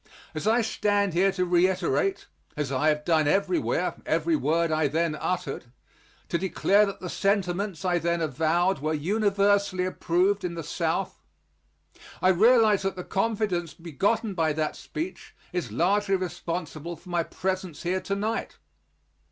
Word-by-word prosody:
As 155 Hz, +6 st, -4 dB
I 230 Hz, +2 st, +4 dB
stand 205 Hz, -3 st, +1 dB
here 190 Hz, +3 st, +3 dB
to 185 Hz, -1 st, 0 dB
reiterate, 185 Hz, -, +1 dB, 0.3 s
as 145 Hz, -3 st, -2 dB
I 145 Hz, +4 st, +2 dB
have 150 Hz, 0 st, -1 dB
done 160 Hz, -3 st, +3 dB
everywhere, 330 Hz, -, +1 dB
every 335 Hz, -, +1 dB
word 165 Hz, -, +1 dB
I 155 Hz, -1 st, +2 dB
then 160 Hz, +2 st, 0 dB
uttered 175 Hz, -3 st, -3 dB, 0.6 s
to 170 Hz, -, 0 dB
declare 200 Hz, +2 st, +3 dB
that 195 Hz, -, -6 dB
the 180 Hz, -, -5 dB
sentiments 195 Hz, -1 st, -1 dB
I 175 Hz, -1 st, +2 dB
then 170 Hz, +1 st, 0 dB
avowed 160 Hz, +3 st, +1 dB
were 155 Hz, +2 st, -1 dB
universally 200 Hz, +2 st, +1 dB
approved 185 Hz, +2 st, +1 dB
in 175 Hz, -1 st, -3 dB
the 165 Hz, -, -5 dB
South -, -, -2 dB, 1.0 s
I 185 Hz, -, +3 dB
realize 215 Hz, +2 st, +5 dB
that 195 Hz, 0 st, -2 dB
the 180 Hz, -, -6 dB
confidence 195 Hz, -5 st, -1 dB
begotten 195 Hz, -, -1 dB
by 160 Hz, -4 st, +1 dB
that 155 Hz, 0 st, -2 dB
speech 165 Hz, +5 st, -7 dB, 0.2 s
is 175 Hz, -11 st, -3 dB
largely 195 Hz, -, +2 dB
responsible 170 Hz, -3 st, -4 dB
for 175 Hz, +3 st, -16 dB
my 175 Hz, -1 st, +1 dB
presence 185 Hz, -1 st, -4 dB
here 185 Hz, +2 st, 0 dB
to 200 Hz, -, -2 dB
night. 220 Hz, +3 st, -3 dB
180 Hz, 150 wpm, -26 LUFS, 165-200 Hz, 1.0 s, realize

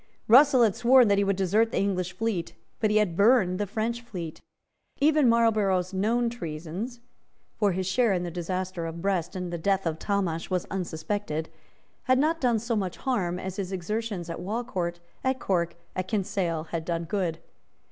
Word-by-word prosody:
Russell 260 Hz, +1 st, +7 dB
had 215 Hz, -4 st, +3 dB
sworn 245 Hz, -1 st, +5 dB
that 200 Hz, 0 st, +4 dB
he -, -, +3 dB
would 200 Hz, 0 st, +1 dB
desert 195 Hz, +4 st, +2 dB
with -, -, -17 dB
the -, -, 0 dB
English 185 Hz, -2 st, 0 dB
fleet; 215 Hz, -7 st, -2 dB, 0.2 s
but 215 Hz, -, +2 dB
he 210 Hz, -, +3 dB
had 205 Hz, -6 st, +2 dB
burned 200 Hz, -3 st, +4 dB
the 205 Hz, -, -1 dB
French 230 Hz, +3 st, -2 dB
fleet. 180 Hz, -9 st, -7 dB, 0.6 s
Even 295 Hz, -3 st, +4 dB
Marlborough's 210 Hz, -5 st, +2 dB
known 230 Hz, +5 st, +1 dB
treasons, 185 Hz, +3 st, -5 dB, 0.5 s
for 205 Hz, -3 st, +1 dB
his 185 Hz, +1 st, -2 dB
share 225 Hz, +4 st, +2 dB
in 180 Hz, -2 st, 0 dB
the 175 Hz, -, -4 dB
disaster 180 Hz, 0 st, -3 dB
of 165 Hz, +1 st, -6 dB
Brest 185 Hz, -3 st, -1 dB
and 180 Hz, -1 st, -4 dB
the 170 Hz, -, -3 dB
death 195 Hz, +2 st, +1 dB
of 160 Hz, -1 st, -2 dB
Talmash 190 Hz, -5 st, -1 dB
was 185 Hz, -2 st, -1 dB
unsuspected, 165 Hz, -2 st, -3 dB, 0.6 s
had 255 Hz, -1 st, +4 dB
not 315 Hz, +4 st, +1 dB
done 245 Hz, -3 st, +3 dB
so 230 Hz, +2 st, -2 dB
much 190 Hz, -4 st, -2 dB
harm 190 Hz, -10 st, -1 dB
as 190 Hz, 0 st, -5 dB
his 195 Hz, -2 st, -3 dB
exertions 195 Hz, 0 st, -3 dB
at 170 Hz, -, -5 dB
Walcourt, 185 Hz, -4 st, -3 dB, 0.2 s
at 260 Hz, 0 st, 0 dB
Cork 170 Hz, -3 st, 0 dB
and -, -, -30 dB, 0.2 s
at -, -, -23 dB
Kinsale 190 Hz, -6 st, -1 dB
had 165 Hz, -1 st, -2 dB
done 170 Hz, 0 st, -2 dB
good. 175 Hz, -2 st, -1 dB
195 Hz, 190 wpm, -27 LUFS, 175-225 Hz, 0.6 s, Russell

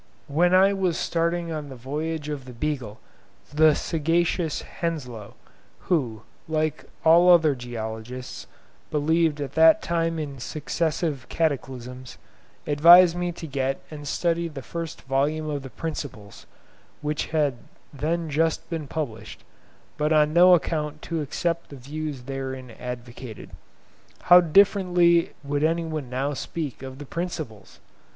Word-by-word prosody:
When 165 Hz, +5 st, +2 dB
[I 195 Hz, +2 st, +5 dB
was] 185 Hz, -4 st, 0 dB
starting 170 Hz, 0 st, -1 dB
on 150 Hz, -2 st, -5 dB
the 135 Hz, -, -8 dB
voyage 150 Hz, +5 st, -4 dB
of 145 Hz, -3 st, -5 dB
the 125 Hz, -, -10 dB
"Beagle", 125 Hz, -4 st, -3 dB, 0.5 s
the 155 Hz, 0 st, +5 dB
sagacious 165 Hz, +1 st, 0 dB
Henslow, 125 Hz, -11 st, -5 dB, 0.4 s
who, 120 Hz, -, -1 dB, 0.2 s
like 155 Hz, -1 st, -1 dB, 0.2 s
all 170 Hz, +2 st, +7 dB
other 165 Hz, -4 st, +6 dB
geologists, 120 Hz, 0 st, -7 dB, 0.4 s
believed 155 Hz, +1 st, +1 dB
at 140 Hz, -1 st, -4 dB
that 160 Hz, +5 st, +6 dB
time 165 Hz, -1 st, 0 dB
in 145 Hz, -4 st, -5 dB
successive 155 Hz, 0 st, -2 dB
cataclysms, 130 Hz, -5 st, -3 dB, 0.5 s
advised 170 Hz, +4 st, +7 dB
me 175 Hz, 0 st, -1 dB
to 165 Hz, -, -8 dB
get 135 Hz, -2 st, -2 dB
and 145 Hz, -1 st, -8 dB
study 170 Hz, +2 st, 0 dB
the 145 Hz, -5 st, -8 dB
first 165 Hz, +2 st, -6 dB
volume 145 Hz, +4 st, 0 dB
of 145 Hz, -1 st, -3 dB
the 135 Hz, -, -9 dB
'Principles,' 115 Hz, -10 st, -7 dB, 0.6 s
which 150 Hz, 0 st, -2 dB
had 150 Hz, -5 st, 0 dB, 0.4 s
then 160 Hz, +4 st, -1 dB
just 160 Hz, +2 st, 0 dB
been 160 Hz, -3 st, -3 dB
published, 135 Hz, -8 st, -5 dB, 0.5 s
but 150 Hz, +1 st, 0 dB
on 150 Hz, -1 st, +4 dB
no 180 Hz, +1 st, +8 dB
account 150 Hz, -1 st, -2 dB
to 165 Hz, -2 st, -2 dB
accept 170 Hz, +4 st, -2 dB
the 140 Hz, -, -9 dB
views 145 Hz, 0 st, -6 dB
therein 130 Hz, -1 st, -5 dB
advocated. 120 Hz, -2 st, -8 dB, 0.7 s
How 180 Hz, 0 st, +8 dB
differently 175 Hz, -1 st, +4 dB
would 145 Hz, +1 st, -1 dB
anyone 160 Hz, -4 st, -1 dB
now 135 Hz, +3 st, -1 dB
speak 145 Hz, -1 st, -5 dB
of 130 Hz, -1 st, -8 dB
the 145 Hz, -, -8 dB
'Principles'! 155 Hz, -, -6 dB
150 Hz, 130 wpm, -25 LUFS, 135-165 Hz, 0.7 s, no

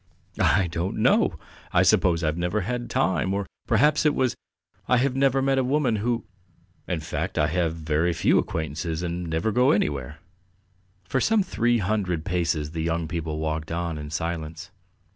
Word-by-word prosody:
"I 95 Hz, -, +3 dB
don't 85 Hz, +2 st, -3 dB
know. -, -, +3 dB, 0.3 s
I -, -, +4 dB
suppose 85 Hz, -2 st, +3 dB
I've 75 Hz, 0 st, +1 dB
never 90 Hz, +5 st, -1 dB
had 120 Hz, +4 st, -3 dB
time, 95 Hz, -2 st, +1 dB
or 100 Hz, 0 st, -2 dB, 0.2 s
perhaps 145 Hz, +7 st, +3 dB
it 150 Hz, -2 st, +3 dB
was 130 Hz, -2 st, +1 dB, 0.5 s
I 125 Hz, -, +4 dB
have 130 Hz, +1 st, +1 dB
never 135 Hz, 0 st, +2 dB
met 135 Hz, -1 st, +2 dB
women 130 Hz, -3 st, +1 dB
who.... 115 Hz, +2 st, -1 dB, 0.6 s
In 85 Hz, -4 st, -2 dB
fact, -, -, -4 dB
I 75 Hz, -, +4 dB
have 80 Hz, 0 st, 0 dB
very 80 Hz, +1 st, 0 dB
few 85 Hz, +1 st, +3 dB
acquaintances 80 Hz, +1 st, -3 dB
and 85 Hz, 0 st, -3 dB
never 80 Hz, +7 st, 0 dB
go 125 Hz, +5 st, +3 dB
anywhere." 75 Hz, -, 0 dB, 0.9 s
For 130 Hz, +8 st, -1 dB
some 220 Hz, -, +3 dB
three 120 Hz, -9 st, +1 dB
hundred 95 Hz, -5 st, -1 dB
paces 85 Hz, -5 st, -1 dB
the 80 Hz, -1 st, -3 dB
young 85 Hz, 0 st, -1 dB
people 80 Hz, -2 st, -3 dB
walked 80 Hz, 0 st, -3 dB
on 85 Hz, -2 st, -2 dB
in 75 Hz, 0 st, -7 dB
silence. 80 Hz, 0 st, -4 dB
90 Hz, 165 wpm, -25 LUFS, 80-120 Hz, 0.9 s, I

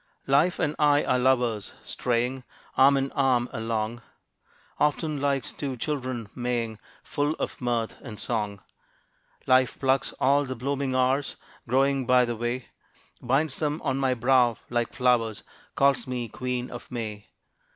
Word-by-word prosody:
Life 150 Hz, +7 st, +3 dB
and 150 Hz, -1 st, 0 dB
I 145 Hz, -1 st, +4 dB
are 125 Hz, -, +2 dB
lovers, 125 Hz, -5 st, +1 dB
straying 125 Hz, +2 st, -1 dB, 0.3 s
Arm 140 Hz, +1 st, +6 dB
in 135 Hz, 0 st, -1 dB
arm 130 Hz, -4 st, +2 dB
along: 115 Hz, +1 st, -2 dB, 0.8 s
Often 150 Hz, 0 st, +1 dB
like 140 Hz, -3 st, -1 dB
two 135 Hz, -3 st, -2 dB
children 130 Hz, -4 st, -3 dB
Maying, 120 Hz, -3 st, -2 dB, 0.2 s
Full 145 Hz, +1 st, -1 dB
of -, -, -5 dB
mirth 120 Hz, -2 st, -1 dB
and 110 Hz, -5 st, -9 dB
song. 105 Hz, -4 st, -3 dB, 0.8 s
Life 130 Hz, -1 st, +3 dB
plucks 135 Hz, 0 st, +1 dB
all 140 Hz, +2 st, +3 dB
the 130 Hz, -1 st, -4 dB
blooming 135 Hz, +1 st, -2 dB
hours 130 Hz, +2 st, +1 dB, 0.3 s
Growing 135 Hz, +1 st, +2 dB
by 125 Hz, -1 st, +5 dB
the 120 Hz, -1 st, -3 dB
way; 120 Hz, +2 st, -3 dB, 0.5 s
Binds 135 Hz, +3 st, +1 dB
them 150 Hz, 0 st, -1 dB
on 135 Hz, 0 st, 0 dB
my 135 Hz, -2 st, +1 dB
brow 125 Hz, -1 st, +3 dB
like 120 Hz, -1 st, 0 dB
flowers; 120 Hz, -4 st, +1 dB, 0.3 s
Calls 140 Hz, -1 st, +3 dB
me 125 Hz, -2 st, -3 dB
Queen 125 Hz, +2 st, -3 dB
of 120 Hz, -, -9 dB
May. 110 Hz, -4 st, -5 dB
130 Hz, 140 wpm, -26 LUFS, 120-135 Hz, 0.8 s, Arm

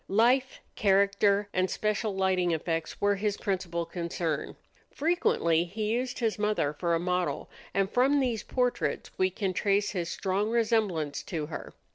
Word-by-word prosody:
Life, 250 Hz, +6 st, +2 dB
character, 200 Hz, 0 st, +3 dB
and 185 Hz, 0 st, +1 dB
special 215 Hz, -1 st, -1 dB
lighting 185 Hz, -2 st, +2 dB
effects 165 Hz, 0 st, -2 dB
were 205 Hz, 0 st, +3 dB
his 205 Hz, 0 st, -1 dB
principal 180 Hz, -4 st, -2 dB
concern. 170 Hz, -2 st, -3 dB, 0.3 s
Frequently 225 Hz, -, +2 dB
he 210 Hz, +4 st, -3 dB
used 250 Hz, +2 st, -1 dB
his 225 Hz, -3 st, -1 dB
mother 210 Hz, -9 st, +1 dB
for 170 Hz, +2 st, 0 dB
a -, -, 0 dB
model, 180 Hz, 0 st, -1 dB, 0.2 s
and 195 Hz, -1 st, +1 dB
from 260 Hz, +6 st, +3 dB
these 245 Hz, -5 st, 0 dB
portraits 250 Hz, -1 st, -1 dB
we 185 Hz, 0 st, +4 dB
can 190 Hz, 0 st, -2 dB
trace 200 Hz, +2 st, +1 dB
his 175 Hz, -4 st, -3 dB
strong 195 Hz, +4 st, -1 dB
resemblance 215 Hz, -10 st, +1 dB
to 155 Hz, -3 st, -3 dB
her. 155 Hz, -, -8 dB
195 Hz, 150 wpm, -29 LUFS, 175-220 Hz, 0.3 s, we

